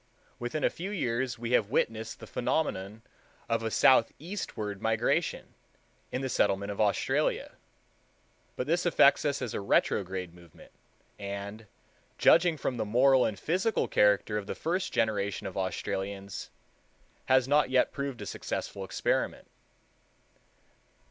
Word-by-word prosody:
Within 120 +5 -3
a - - +3
few 185 +4 -6
years 130 - -1
we 115 +1 -4
have 110 -4 +3
witnessed 110 -1 -1
the - - -9
phenomenon 110 -6 -2 0.4
of 115 0 0
a 115 - -1
southeastward 115 - +1
migration, 120 +9 0 0.6
in 125 - -2
the 135 - -1
settlement 100 -4 +1
of 100 - -2
Australia; 105 -2 +1 1.0
but 125 - -2
this 170 +4 +1
affects 155 -5 +4
us 140 -2 0
as 120 - -4
a - - -3
retrograde 95 -2 0
movement, 85 -2 -17 0.5
and, 100 +2 -6 0.5
judging 170 -1 +5
from 130 -3 -2
the - - 0
moral 130 +5 +4
and 105 - -2
physical 185 - 0
character 105 +1 +3
of 100 - -9
the - - -4
first 180 +3 -2
generation 105 -2 0
of 95 - -5
Australians, 95 +1 -4 0.8
has 130 -1 +4
not 145 -1 +3
yet 130 -1 +3
proved 140 -3 -4
a - - -7
successful 100 - -4
experiment. 95 - -1
115 Hz, 135 wpm, -29 LUFS, 100-135 Hz, 1.0 s, judging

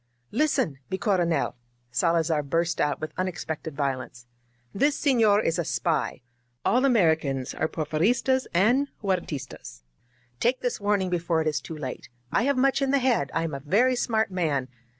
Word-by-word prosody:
"Listen, 225 - +1
mi 190 - -2
Coronel, 175 -8 +1 0.4
Salazar 165 +3 +2
burst 165 +3 0
out 145 -1 0
with 155 0 -5
unex 185 -3 -3
pected 160 0 -5
violence. 130 -4 -3 0.5
"This 285 +7 +1
sefior 225 -7 +4
is 165 +2 +1
a - - +1
spy. 165 -4 -1 0.4
All 255 +3 +3
Americans 160 - +2
are - - -1
Porfiristas 200 - +1
and 240 +11 +3 0.2
Huertistas. 140 - -4 0.6
Take 250 +2 +1
this 245 -4 -2
warning 200 -3 +1
be 175 - +1
fore 165 -1 0
it - - -3
is 150 -1 0
too 160 - -8
late. 130 -4 -6 0.2
I 230 - +2
have 280 -1 +1
much 270 +2 +3
in 275 - +1
the 280 - +4
head. 245 - +1
I 165 - +1
am 165 -2 -3
a 140 - -3
very 215 - +2
smart 220 -3 0
man. 150 -8 -1
170 Hz, 170 wpm, -26 LUFS, 150-230 Hz, 0.6 s, sefior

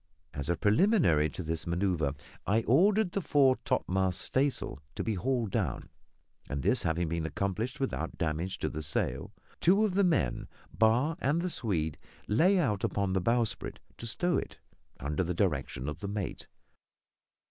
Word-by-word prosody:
As 70 +1 -3
a 85 - +2
preliminary 105 - +3
to 90 - -6
this 80 +1 -3
manoeuvre. 85 -5 0 0.3
I 110 +3 +2
ordered 195 - +4
the 200 - -1
fore 135 -5 +4
topmast 95 -1 0
staysail 135 - 0 0.2
to - - -2
be 110 - -1
hauled 120 +1 -1
down; 95 - -2 0.6
and 70 -2 -3
this - - +3
having 85 +1 0
been 85 0 -2
accomplished 100 - -2
without 130 -11 -3
damage 85 +4 -2
to - - -2
the 80 - -5
sail, 75 -3 -2 0.3
two 195 +5 +4
of 205 - -1
the 200 +1 +3
men 150 - +1 0.3
Barr 120 +9 +3
and 160 +3 +1
the 180 - -1
Swede 80 - -1 0.3
lay 175 - +4
out 105 - +1
upon 100 -2 0
the 95 - +1
bowsprit 115 +3 0 0.2
to 115 - -5
stow 175 +9 +1
it, - - -8 0.4
under 75 +5 -1
the 90 0 -2
direction 75 -8 -1
of 75 - -4
the 100 - -5
mate. 100 -1 -4
100 Hz, 165 wpm, -30 LUFS, 80-135 Hz, 0.6 s, ordered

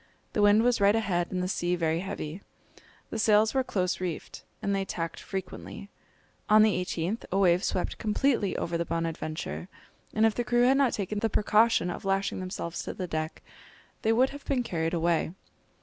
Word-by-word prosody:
The 210 - +1
wind 205 +2 +6
was 245 -3 +2
right 200 +2 +5
ahead 180 -6 0
and 180 -1 -1
the - - -1
sea 180 -1 0
very 165 -1 0
heavy. 175 -2 -5 0.7
The 225 - -3
sails 215 0 +4
were 265 -1 +2
close 185 -6 -1
reefed, 175 -3 -5 0.2
and 200 - -1
they 195 0 0
tacked 165 -3 -4
frequently. 195 +1 -7 0.6
On 215 0 +7
the 205 -4 +2
18th, 180 +5 -3
a 190 - +1
wave 180 -2 +4
swept 180 - -2
completely 220 -2 +1
over 170 0 -2
the - - +1
Bonadventure; 165 0 -3 0.5
and 220 +1 +4
if 225 - +3
the 240 - -1
crew 240 +1 +2
had 265 +2 +5
not 275 -4 +3
taken 205 +1 -2
the 225 - 0
precaution 215 -3 +3
of - - -7
lashing 195 0 0
themselves 185 -2 -4
to - - -6
the 185 - -3
deck, 155 -1 -4 0.6
they 220 - +2
would 250 +4 +3
have 285 0 -9
been 260 -3 0
carried 165 -4 -1
away. 170 0 +1
195 Hz, 190 wpm, -28 LUFS, 175-220 Hz, 0.7 s, On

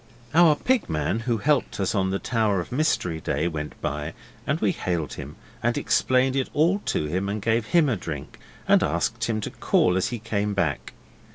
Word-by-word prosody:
Our 165 -1 +6
Pig 255 - 0
man 80 +6 0
who 115 0 0
helped 140 +3 +1
us 95 - 0
on 95 -2 +1
the 95 - 0
Tower 110 -3 0
of 85 - -6
Mystery 125 - 0
day 85 - -1
went 75 -3 -5
by 75 +2 -3 0.3
and - - +1
we - - +2
hailed 85 -4 -2
him, - - -8 0.3
and - - +1
explained 130 +1 +2
it 135 -1 0
all 170 +7 +3
to - - 0
him 95 +6 -2
and 105 +2 -2
gave 110 +1 0
him 170 +1 +4
a 120 -6 0
drink, 75 -6 -7 0.3
and - - +5
asked 115 +1 0
him 115 -2 -1
to - - -4
call 90 - +2
as 95 - +1
he 120 - -3
came 105 -2 -2
back. 85 -7 -1
105 Hz, 200 wpm, -25 LUFS, 90-125 Hz, 0.3 s, Our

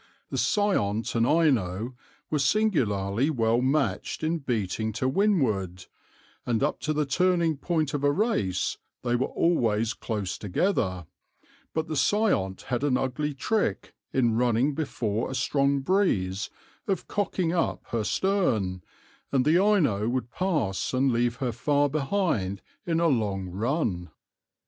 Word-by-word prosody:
"The - - -2
Seiont 115 - +1
and 115 0 +2
Ino 125 - +1 0.4
were 150 - +1
singularly 130 - +1
well 115 -4 +2
matched 140 +4 0
in 165 +1 0
beating 110 -5 -2
to 130 +4 -1
windward, 120 - +1 0.6
and 120 +1 0
up 150 - 0
to 155 - -2
the 150 0 0
turning 170 +2 +2
point 155 0 -1
of 145 -1 -2
a 145 - +4
race 145 - 0 0.2
they 120 -1 +1
were 125 +2 +1
always 115 -9 +1
close 105 -7 -4
together, 95 - 0 0.7
but 160 0 -1
the 160 - -4
Seiont 155 - +1
had 125 0 -2
an 135 -3 +2
ugly 140 +3 -2
trick 215 +11 -1 0.2
in 120 -4 +2
running 120 +4 +2
before 120 -7 -2
a 130 - -4
strong 140 +1 +1
breeze 110 - +1 0.4
of 195 -4 -1
cocking 185 -4 -1
up 170 -2 0
her 115 -2 -1
stern, 110 - 0 0.5
and 130 -2 +2
the 170 +5 +4
Ino 140 - +2
would 125 -1 -2
pass 140 - -1
and 130 +1 +3
leave 120 0 +1
her 125 -1 -2
far 145 +5 +1
behind 135 - -1 0.2
in 165 -1 +1
a 170 - +3
long 100 - 0
run. 100 - -1
130 Hz, 140 wpm, -27 LUFS, 110-160 Hz, 0.7 s, a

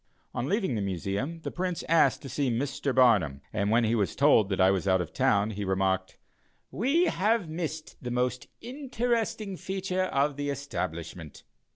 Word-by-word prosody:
On 120 - -2
leaving 195 - 0
the 110 - -1
Museum, 100 - -3
the - - -5
Prince 180 -1 -3
asked 155 -5 +3
to - - -6
see 135 +1 0
Mr. 135 +2 -1
Barnum, 100 - +4
and 100 -1 0
when 115 +2 +4
he 110 0 +1
was 100 -8 0
told 130 -8 +4
that 95 - -1
I 95 0 +6
was 95 0 -1
out 95 -1 +4
of 90 - -4
town, 105 +1 +2
he 105 0 -4
remarked: 95 -1 0 0.5
"We 275 - +2
have 215 - +1
missed 155 -2 -5
the 125 - -3
most 125 +1 -1
interesting 235 -6 -2
feature 190 0 -2
of 140 -3 0
the 145 0 -2
establishment." 85 - -5
130 Hz, 175 wpm, -28 LUFS, -, 0.5 s, I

